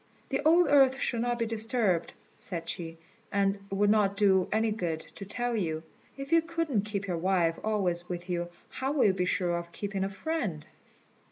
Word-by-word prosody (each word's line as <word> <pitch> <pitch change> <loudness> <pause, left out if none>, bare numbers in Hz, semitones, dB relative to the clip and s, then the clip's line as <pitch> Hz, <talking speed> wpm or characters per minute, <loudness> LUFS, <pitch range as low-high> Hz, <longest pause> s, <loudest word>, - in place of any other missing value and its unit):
"The 270 - 0
old 335 +3 +6
earth 270 -2 +5
should 235 -2 0
not 240 0 0
be 230 - 0
disturbed," 220 -5 0 0.3
said 170 -3 -4
she, 165 -1 -3 0.3
"and 200 0 +1
it - - -6
would 205 +1 +3
not 200 -2 +2
do 190 -3 +4
any 220 +1 +2
good 175 -7 -2
to 195 - -10
tell 240 +4 -2
you. 160 -6 -2 0.3
If 275 +2 -7
you 330 0 +6
couldn't 325 -10 -1
keep 200 -2 -3
your 175 -4 -2
wife 175 -2 +1
always 180 -5 0
with 175 0 -5
you, 175 -1 -2 0.2
how 265 +2 -2
will 285 - +3
you 195 - +5
be 180 -1 0
sure 180 -1 +1
of 170 0 -5
keeping 200 +1 -3
a 195 - -1
friend?" 195 - -3
200 Hz, 195 wpm, -29 LUFS, 175-240 Hz, 0.3 s, old